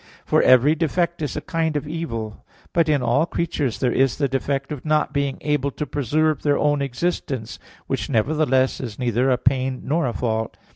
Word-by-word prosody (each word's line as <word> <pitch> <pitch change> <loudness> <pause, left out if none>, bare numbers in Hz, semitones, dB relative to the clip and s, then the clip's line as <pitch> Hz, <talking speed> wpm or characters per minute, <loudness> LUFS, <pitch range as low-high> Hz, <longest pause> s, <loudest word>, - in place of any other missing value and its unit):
For - - +3
every 130 +4 +6
defect 170 +1 -1
is 150 - -3
a - - -2
kind 165 -2 -1
of 145 - -4
evil. 115 -10 -5 0.3
But 165 -2 +2
in 145 -4 +2
all 140 +8 +2
creatures 145 -9 -2
there 125 -2 +1
is 135 0 +2
the 140 - +1
defect 135 +2 -2
of 145 -4 -5
not 155 -1 +1
being 140 -2 -1
able 150 -2 0
to 150 +2 -4
preserve 145 +2 0
their 145 -1 +2
own 145 -1 +1
existence, 135 -4 -3 0.3
which - - -3
nevertheless 130 +2 +2
is 115 -5 -6
neither 125 +1 +1
a 125 - +3
pain 130 0 0
nor 150 +1 0
a 120 - -2
fault. 110 -2 -2
140 Hz, 190 wpm, -22 LUFS, 125-155 Hz, 0.3 s, every